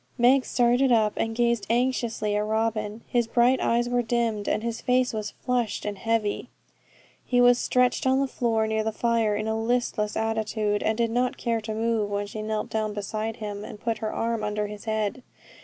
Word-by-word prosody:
Meg 255 +2 +5
started 245 +2 +3
up, 215 -3 +3
and 225 0 -2
gazed 235 -4 +1
anxiously 235 -3 0
at 210 - +1
Robin. 220 0 -1
His 240 -2 0
bright 245 +3 +3
eyes 240 +1 +2
were 245 0 +1
dimmed, 230 -3 -1
and 215 - 0
his 230 -1 -3
face 250 0 +2
was 215 -1 -3
flushed 245 -4 -2
and 205 -1 -2
heavy; 225 +1 -1 0.7
he 245 - +1
was 245 0 +6
stretched 250 +1 +2
on 260 +1 +3
the 275 - +2
floor 230 -4 0
near 220 0 0
the 220 - -1
fire, 225 -1 +1
in 215 +1 -2
a 220 - 0
listless 225 -3 0
attitude, 220 -1 -1
and 220 0 0
did 230 -1 +1
not 245 +2 0
care 230 -2 -1
to 215 0 -5
move, 225 -2 0
when 205 0 -2
she 215 +1 -6
knelt 215 0 -3
down 215 -1 -1
beside 215 +2 -3
him, 210 -2 -6
and 210 - -9
put 230 0 -2
her 215 -1 -2
arm 230 -1 -1
under 210 0 -1
his 210 +1 -8
head. 220 +2 -1
225 Hz, 200 wpm, -26 LUFS, 215-240 Hz, 0.7 s, was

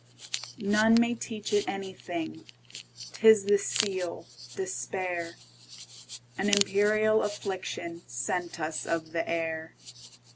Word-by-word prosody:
None 215 +1 +4
may 235 0 +3
teach 225 -3 -5
it 205 0 +2
anything,'T 160 - -8
is 220 -3 +8
the 205 0 +4
seal, 185 -6 -1 0.3
despair,—An 125 - -5
imperial 210 +2 +4
afflictionSent 175 - -4
us 155 0 -3
of 160 -1 -2
the 165 0 -2
air. 160 -1 -2
180 Hz, 85 wpm, -29 LUFS, 160-205 Hz, 0.3 s, is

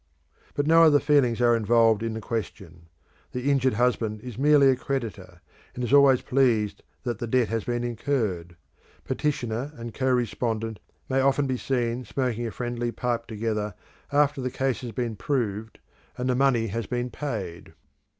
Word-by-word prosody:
But 145 - 0
no 165 +2 +6
other 155 -3 +6
feelings 140 -6 +2
are 120 -1 +5
involved 115 -1 +3
in 115 -1 -2
the 110 - -5
question. 95 -7 -6 0.5
The 125 +3 0
injured 130 -2 +2
husband 115 -3 0
is 125 -2 -8
merely 140 0 +5
a - - +2
creditor, 105 -9 -5 0.3
and 125 - -4
is 120 - -1
always 140 -3 +6
pleased 120 -6 +1 0.2
that 120 -4 -3
the 120 - -3
debt 125 0 +2
has 115 -2 -2
been 120 0 -1
incurred. 110 -8 -2 0.5
Petitioner 130 -2 -2
and 115 -3 -7
co 130 - -1
respondent 115 -3 -1 0.3
may 135 0 +1
often 135 +1 +2
be 130 -1 -1
seen 120 -1 -1
smoking 120 -1 -2
a - - -5
friendly 120 0 -3
pipe 120 -1 -2
together 105 -2 -3 0.4
after 145 -1 +2
the 130 - -1
case 130 0 -1
has 120 -2 -6
been 115 0 -3
proved 110 -4 -2 0.4
and 125 - -2
the 125 - +2
money 130 -3 +3
has 115 +1 -3
been 125 0 -2
paid. 105 - -5
120 Hz, 170 wpm, -26 LUFS, 110-130 Hz, 0.5 s, no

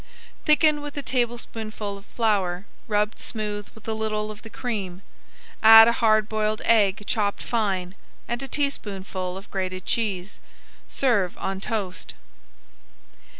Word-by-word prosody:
Thicken 305 -1 +4
with 290 0 -7
a 285 - -3
tablespoonful 225 -5 -3
of 200 0 -13
flour 200 -5 0 0.2
rubbed 210 0 0
smooth 210 -2 -4
with 220 0 -15
a 220 - 0
little 215 -1 -2
of 215 0 -11
the 225 - -10
cream. 200 -7 -4 0.6
Add 225 0 +10
a - - +5
hard 215 -2 +4
boiled 215 0 -1
egg 210 -3 +3
chopped 205 -2 -1
fine, 195 -6 -1 0.3
and 240 +1 -3
a 270 - -5
teaspoonful 195 -10 -3
of 195 +3 -12
grated 185 -2 -3
cheese. 205 -3 -2 0.5
Serve 205 -9 +1
on 190 0 -3
toast. 195 -4 -4
215 Hz, 135 wpm, -25 LUFS, 195-230 Hz, 0.6 s, Add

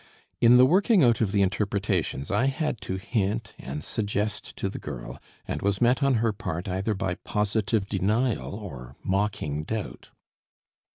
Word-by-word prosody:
In 120 +1 +7
the 125 - +8
working 190 - +4
out 120 -2 +4
of 105 -4 +2
the 100 -1 +3
interpretations 100 -6 -1
I 105 +6 +2
had 135 -4 -1
to 95 - -3
hint 100 +2 -2
and 75 +3 -6
suggest 105 +1 -2
to - - -2
the 95 - -5
girl, - - -7 0.3
and - - -3
was 100 -1 +1
met 125 +3 +3
on 135 -2 +3
her 115 -1 +1
part 85 -3 -4
either 95 +3 -1
by 95 -1 -1
positive 105 0 0
denial 105 +3 0
or 70 - -8
mocking 95 -7 -1
doubt. 110 +4 -5
105 Hz, 160 wpm, -26 LUFS, 95-115 Hz, 0.3 s, the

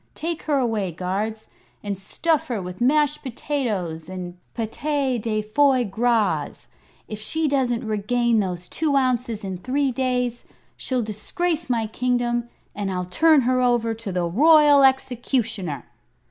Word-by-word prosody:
"Take 330 0 -3
her 290 - +3
away, 220 -7 0
guards, 200 +6 -3 0.4
and 205 -1 -2
stuff 295 - -1
her 235 -4 -2
with 180 +1 -7
mashed 295 +3 +2
potatoes 215 - -3
and 180 -1 -6 0.2
pate 260 +2 -1
de 215 -1 -1
foi 260 +4 +3
gras. 225 +2 0 0.4
If 215 - -6
she 315 +9 0
doesn't 255 -4 0
regain 225 +2 +1
those 180 -3 -3
two 305 -3 0
ounces 250 -4 0
in 190 -2 -4
three 270 +6 0
days, 250 -2 -1 0.3
she'll 255 -2 -1
disgrace 315 - -2
my 230 -2 +1
kingdom, 240 +1 -1 0.2
and 200 -1 -3
I'll 180 -1 -2
turn 305 - +4
her 255 +1 +2
over 240 -2 +2
to 225 -3 -6
the 180 -1 -1
Royal 295 - +6
Executioner." 240 - 0
240 Hz, 140 wpm, -23 LUFS, 205-270 Hz, 0.4 s, Royal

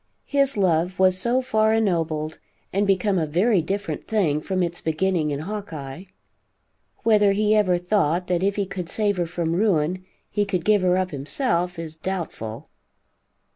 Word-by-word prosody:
His 275 -4 +1
love 180 -1 +1
was 185 0 +3
so 245 +6 +1
far 220 -2 +2
ennobled, 165 -7 -1 0.3
and 200 +2 +1
become 195 0 +2
a 160 - -1
very 185 +5 +2
different 195 +5 -4
thing 170 -10 +1
from 185 +2 -1
its 170 0 -3
beginning 160 0 0
in 145 0 -3
Hawkeye. 165 -5 -6 1.0
Whether 210 -3 +4
he 210 +1 +2
ever 195 -4 +3
thought 180 -2 +1
that 180 -1 0
if 200 +1 +1
he 200 - 0
could 185 -3 -6
save 205 -3 0
her 175 -1 0
from 170 -1 -2
ruin, 185 -3 +1 0.3
he 205 - +1
could 185 -4 -2
give 210 -2 +4
her 180 0 +3
up 185 0 -1
himself, 175 - -1
is 160 -1 -6
doubtful. 160 - -5
185 Hz, 165 wpm, -23 LUFS, 165-205 Hz, 1.0 s, Whether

